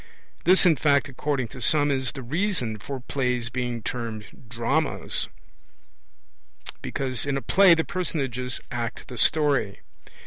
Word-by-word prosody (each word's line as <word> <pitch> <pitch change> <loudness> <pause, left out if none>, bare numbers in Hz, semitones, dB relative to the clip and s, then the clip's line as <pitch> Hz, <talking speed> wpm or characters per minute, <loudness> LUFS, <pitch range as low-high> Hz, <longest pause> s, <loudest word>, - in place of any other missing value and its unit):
This 185 +3 +6
in 165 -4 +5
fact, 140 -1 +3
according 135 -2 -2
to 125 - -10
some, 145 +4 +3
is 130 -3 -1
the 135 - -7
reason 140 - -1
for 130 +8 -6
plays 125 -3 -1
being 120 -2 -3
termed 115 -1 -6
dramas, 135 +6 0 1.5
because 130 -2 -2
in 140 -1 0
a - - 0
play 190 -2 +6
the 160 - 0
personages 135 -8 -2
act 120 -1 -4
the 125 - -7
story. 145 -10 +2
130 Hz, 135 wpm, -25 LUFS, 120-150 Hz, 1.5 s, This